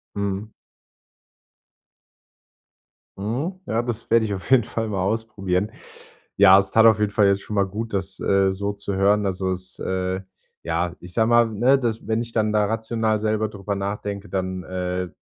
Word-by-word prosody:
Mhm. 100 Hz, +1 st, -3 dB, 2.7 s
Mhm. 140 Hz, -, -3 dB
Ja, 115 Hz, +2 st, 0 dB
das 120 Hz, -2 st, -5 dB
werde 115 Hz, -1 st, +4 dB
ich 105 Hz, -, -3 dB
auf 95 Hz, -, -8 dB
jeden 130 Hz, -3 st, +6 dB
Fall 115 Hz, 0 st, -3 dB
mal 100 Hz, -3 st, -1 dB
ausprobieren. 100 Hz, -1 st, -1 dB, 0.6 s
Ja, 95 Hz, -1 st, +8 dB
es 95 Hz, -1 st, 0 dB
tat 110 Hz, 0 st, +5 dB
auf 110 Hz, -1 st, +5 dB
jeden 105 Hz, -1 st, +1 dB
Fall 105 Hz, -2 st, +4 dB
jetzt 100 Hz, 0 st, +2 dB
schon 105 Hz, -, -5 dB
mal 100 Hz, -1 st, +3 dB
gut, 110 Hz, +3 st, -5 dB
das, 95 Hz, 0 st, -3 dB
äh, 95 Hz, -1 st, +2 dB
so 100 Hz, +2 st, -2 dB
zu 100 Hz, -1 st, -5 dB
hören. 100 Hz, +2 st, +3 dB
Also, 95 Hz, 0 st, -1 dB
es, 95 Hz, 0 st, -5 dB
äh, 95 Hz, 0 st, -2 dB, 0.4 s
ja, 85 Hz, +1 st, -1 dB
ich 90 Hz, 0 st, -11 dB
sage 110 Hz, -, +3 dB
mal, 120 Hz, -1 st, +5 dB
ne, 120 Hz, +6 st, +3 dB
dass 115 Hz, -3 st, -2 dB
wenn 110 Hz, +1 st, 0 dB
ich 115 Hz, -1 st, -8 dB
dann 110 Hz, -1 st, +1 dB
da 105 Hz, -1 st, +2 dB
rational 110 Hz, 0 st, -1 dB
selber 110 Hz, 0 st, 0 dB
darüber 100 Hz, -1 st, -4 dB
nachdenke, 100 Hz, +1 st, -4 dB
dann, 95 Hz, -1 st, -3 dB
äh, 90 Hz, 0 st, -3 dB
100 Hz, 175 wpm, -23 LUFS, 95-110 Hz, 2.7 s, Ja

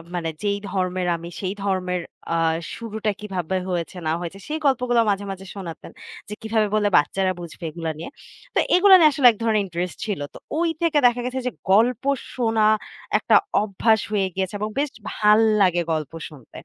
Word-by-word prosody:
মানে 165 Hz, -2 st, -2 dB
যেই 200 Hz, -1 st, 0 dB
ধর্মের 185 Hz, -2 st, -1 dB
আমি 170 Hz, +1 st, -8 dB
সেই 190 Hz, -1 st, -2 dB
ধর্মের 185 Hz, -2 st, -1 dB, 0.3 s
আ -, -, +1 dB, 0.4 s
শুরুটা 220 Hz, -2 st, -3 dB
কিভাবে 190 Hz, -3 st, -3 dB
হয়েছে 175 Hz, 0 st, -3 dB
না -, -, +2 dB
হয়েছে 175 Hz, +2 st, -6 dB
সেই 310 Hz, -, -2 dB
গল্পগুলো 250 Hz, -3 st, +3 dB
মাঝে, 200 Hz, 0 st, 0 dB
মাঝে 190 Hz, 0 st, -8 dB
শোনাতেন। 175 Hz, -5 st, -8 dB, 0.4 s
যে -, -, -5 dB
কিভাবে 220 Hz, -1 st, +1 dB
বলে 210 Hz, -1 st, +2 dB
বাচ্চারা 185 Hz, +6 st, +1 dB
বুঝবে 170 Hz, 0 st, -10 dB
এগুলা 165 Hz, 0 st, -4 dB
নিয়ে। 165 Hz, -, -7 dB, 0.4 s
তো -, -, +2 dB, 0.2 s
এগুলা 380 Hz, +1 st, +8 dB
নিয়ে 315 Hz, -3 st, +7 dB
আসলে 275 Hz, -3 st, +5 dB
এক 220 Hz, -, -11 dB
ধরনের 220 Hz, -2 st, +2 dB
interest 175 Hz, 0 st, -4 dB
ছিল। 205 Hz, -7 st, -3 dB
তো -, -, -10 dB, 0.2 s
ওই 335 Hz, 0 st, +2 dB
থেকে 335 Hz, -3 st, +2 dB
দেখা 245 Hz, 0 st, +4 dB
গেছে 255 Hz, +1 st, -2 dB
যে 250 Hz, -, -1 dB, 0.2 s
গল্প 225 Hz, +4 st, +3 dB, 0.3 s
শোনা 225 Hz, -3 st, +2 dB, 0.5 s
একটা -, -, +3 dB, 0.3 s
অভ্যাস 220 Hz, +2 st, +2 dB
হয়ে 200 Hz, -3 st, +1 dB
গিয়েছে 190 Hz, 0 st, -2 dB
এবং 215 Hz, +1 st, -2 dB
বেশ 290 Hz, +1 st, 0 dB, 0.2 s
ভাল্লাগে 210 Hz, -4 st, +4 dB
গল্প 155 Hz, -2 st, -2 dB, 0.2 s
শুনতে। 140 Hz, -7 st, -14 dB
200 Hz, 175 wpm, -23 LUFS, 180-225 Hz, 0.5 s, এগুলা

